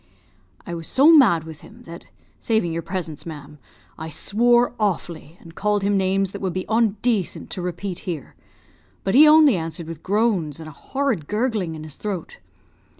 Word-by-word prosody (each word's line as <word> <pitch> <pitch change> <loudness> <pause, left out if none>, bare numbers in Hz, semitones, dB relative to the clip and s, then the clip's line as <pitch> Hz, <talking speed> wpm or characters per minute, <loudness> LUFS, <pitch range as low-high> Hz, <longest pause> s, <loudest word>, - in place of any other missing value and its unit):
"I 175 - -6
was 165 -1 -5
so 300 +5 +6
mad 200 - +5
with 160 -2 -11
him, 240 +3 -15
that 170 0 -11 0.3
(saving 220 -7 0
your 165 - -2
presence, 165 -5 -5
ma'am) 150 -2 -10 0.4
I 160 0 -6
swore 240 +9 +2
awfully, 170 -5 -3
and 165 - -14
called 205 +2 0
him 200 +1 +1
names 195 0 +1
that 200 - -8
would 190 -3 -2
be 185 +1 -3
ondacent 220 -2 0
to 185 - -4
repeat 180 +1 -4
here; 160 -6 -6 0.7
but 195 - -1
he 295 +5 +8
only 305 -5 +6
answered 165 -1 -5
with 165 -1 -8
groans 195 -7 0
and 160 - -9
a - - -9
horrid 250 - -3
gurgling 210 -7 -1
in 155 - -8
his 155 -2 -9
throat. 195 -6 -6
190 Hz, 175 wpm, -22 LUFS, 165-220 Hz, 0.7 s, he